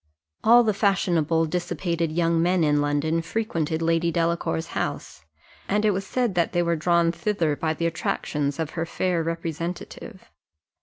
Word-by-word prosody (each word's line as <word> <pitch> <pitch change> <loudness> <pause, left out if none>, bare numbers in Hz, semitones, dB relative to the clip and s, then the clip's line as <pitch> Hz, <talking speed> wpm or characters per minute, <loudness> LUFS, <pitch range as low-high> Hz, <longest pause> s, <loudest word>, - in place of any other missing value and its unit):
All 240 +2 +7
the 215 -2 +1
fashionable 170 -5 +1
dissipated 170 -1 -2
young 165 0 +1
men 175 0 +2
in 150 -1 +3
London 145 +3 0
frequented 165 -4 -2
Lady 165 +1 +1
Delacour's 165 -1 -1
house, - - -4 0.4
and 210 +2 +1
it 210 - +4
was 195 0 -3
said 245 -5 0
that 170 -2 0
they 175 - +2
were 170 0 +1
drawn 170 +1 +2
thither 170 -5 -1
by 160 +1 -1
the 170 - -2
attractions 150 -3 -2
of 160 -2 -3
her 165 -1 -3
fair 180 -1 0
representative. 165 +1 -5
170 Hz, 155 wpm, -24 LUFS, 160-180 Hz, 0.4 s, All